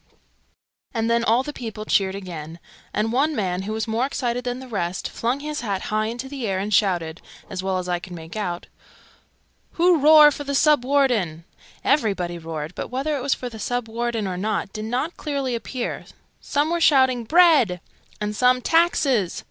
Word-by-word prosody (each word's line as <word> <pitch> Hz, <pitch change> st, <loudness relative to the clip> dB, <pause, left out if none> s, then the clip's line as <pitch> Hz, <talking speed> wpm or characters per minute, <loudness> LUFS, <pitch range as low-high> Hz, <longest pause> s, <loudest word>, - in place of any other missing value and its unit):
and 225 Hz, 0 st, 0 dB
then 235 Hz, 0 st, +2 dB
all 235 Hz, +3 st, +3 dB
the 295 Hz, -, -6 dB
people 220 Hz, -4 st, -6 dB
cheered 195 Hz, -2 st, +1 dB
again, 170 Hz, -4 st, -7 dB, 0.3 s
and 215 Hz, +1 st, -1 dB
one 290 Hz, +5 st, +1 dB
man, 185 Hz, -4 st, -1 dB
who 200 Hz, +3 st, -5 dB
was 220 Hz, 0 st, -2 dB
more 225 Hz, +2 st, 0 dB
excited 245 Hz, -3 st, -2 dB
than 245 Hz, 0 st, -3 dB
the 260 Hz, 0 st, -9 dB
rest, 185 Hz, -6 st, -3 dB
flung 245 Hz, +4 st, -2 dB
his 300 Hz, 0 st, -4 dB
hat 200 Hz, -5 st, -2 dB
high 215 Hz, 0 st, +1 dB
into 240 Hz, +3 st, -5 dB
the 265 Hz, -4 st, -4 dB
air, 190 Hz, -1 st, 0 dB
and 205 Hz, +3 st, -2 dB
shouted 175 Hz, -6 st, +1 dB, 0.3 s
(as 185 Hz, -2 st, -3 dB
well 190 Hz, 0 st, -1 dB
as 180 Hz, 0 st, -4 dB
I 175 Hz, -1 st, 0 dB
could 180 Hz, +1 st, -10 dB
make 165 Hz, +1 st, -9 dB
out) 175 Hz, -5 st, -3 dB, 1.1 s
"Who 350 Hz, 0 st, +4 dB
roar 300 Hz, +1 st, +8 dB
for 290 Hz, -, -5 dB
the 280 Hz, 0 st, -3 dB
Sub 300 Hz, -2 st, +4 dB
Warden?" 245 Hz, -, +1 dB, 0.4 s
Everybody 195 Hz, -, +1 dB
roared, 160 Hz, 0 st, -6 dB
but -, -, -5 dB
whether 275 Hz, +4 st, -2 dB
it 275 Hz, -, -3 dB
was 275 Hz, +1 st, +1 dB
for 250 Hz, -, -6 dB
the 225 Hz, -2 st, -9 dB
Sub 245 Hz, +1 st, -2 dB
Warden, 230 Hz, -1 st, -2 dB
or 185 Hz, -2 st, -3 dB
not, 210 Hz, 0 st, -2 dB
did 215 Hz, 0 st, -5 dB
not 255 Hz, +9 st, -2 dB
clearly 280 Hz, -4 st, -2 dB
appear: 240 Hz, +1 st, -4 dB, 0.3 s
some 295 Hz, +2 st, 0 dB
were 340 Hz, 0 st, 0 dB
shouting 260 Hz, -6 st, +4 dB
"Bread!" 300 Hz, -, +5 dB, 0.4 s
and 210 Hz, 0 st, -3 dB
some 250 Hz, +2 st, +4 dB
"Taxes!" 275 Hz, -, +2 dB
230 Hz, 190 wpm, -23 LUFS, 195-270 Hz, 1.1 s, roar